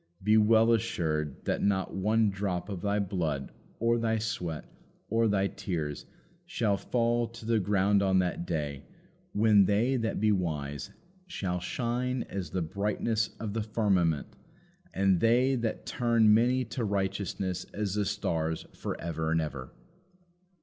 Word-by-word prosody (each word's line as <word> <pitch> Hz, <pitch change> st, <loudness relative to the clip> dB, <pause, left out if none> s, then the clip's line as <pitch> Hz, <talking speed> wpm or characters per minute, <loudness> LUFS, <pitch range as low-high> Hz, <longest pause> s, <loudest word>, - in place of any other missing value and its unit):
Be 105 Hz, +2 st, +4 dB
well 110 Hz, +1 st, +5 dB
assured 80 Hz, -, -1 dB
that -, -, 0 dB
not 95 Hz, -2 st, 0 dB
one 105 Hz, +2 st, +2 dB
drop 95 Hz, -1 st, -3 dB
of 95 Hz, -4 st, -5 dB
thy 100 Hz, 0 st, 0 dB
blood 85 Hz, -9 st, -2 dB, 0.3 s
or 115 Hz, +1 st, +2 dB
thy 115 Hz, -1 st, +1 dB
sweat 90 Hz, -8 st, -3 dB, 0.4 s
or 115 Hz, +1 st, +2 dB
thy 100 Hz, -2 st, +2 dB
tears 90 Hz, -7 st, -4 dB, 0.4 s
shall 105 Hz, -4 st, +1 dB
fall 120 Hz, +2 st, 0 dB
to 115 Hz, -1 st, -12 dB
the 115 Hz, -1 st, +2 dB
ground 100 Hz, 0 st, +2 dB
on 95 Hz, -1 st, +3 dB
that 90 Hz, -1 st, 0 dB
day 75 Hz, -5 st, -3 dB, 0.5 s
when 105 Hz, -2 st, +5 dB
they 115 Hz, +7 st, +2 dB
that 115 Hz, -2 st, -1 dB
be 110 Hz, +1 st, +3 dB
wise 75 Hz, -7 st, -2 dB, 0.4 s
shall 90 Hz, -, -2 dB
shine 120 Hz, +6 st, -2 dB
as 95 Hz, -5 st, -5 dB
the 90 Hz, +1 st, -1 dB
brightness 105 Hz, +5 st, -1 dB
of 105 Hz, -2 st, -4 dB
the 115 Hz, -, -1 dB
firmament, 95 Hz, -8 st, 0 dB, 0.6 s
and 95 Hz, -2 st, +2 dB
they 125 Hz, +5 st, +4 dB
that 115 Hz, -3 st, -2 dB
turn 115 Hz, -3 st, +3 dB
many 125 Hz, +3 st, +3 dB
to 115 Hz, +2 st, -4 dB
righteousness 95 Hz, -2 st, -2 dB
as 105 Hz, -2 st, -3 dB
the 105 Hz, 0 st, 0 dB
stars 80 Hz, -3 st, -2 dB
for -, -, -5 dB
ever 80 Hz, -1 st, -2 dB
and 80 Hz, -, +3 dB
ever. 70 Hz, -5 st, -5 dB
100 Hz, 150 wpm, -29 LUFS, 90-115 Hz, 0.6 s, well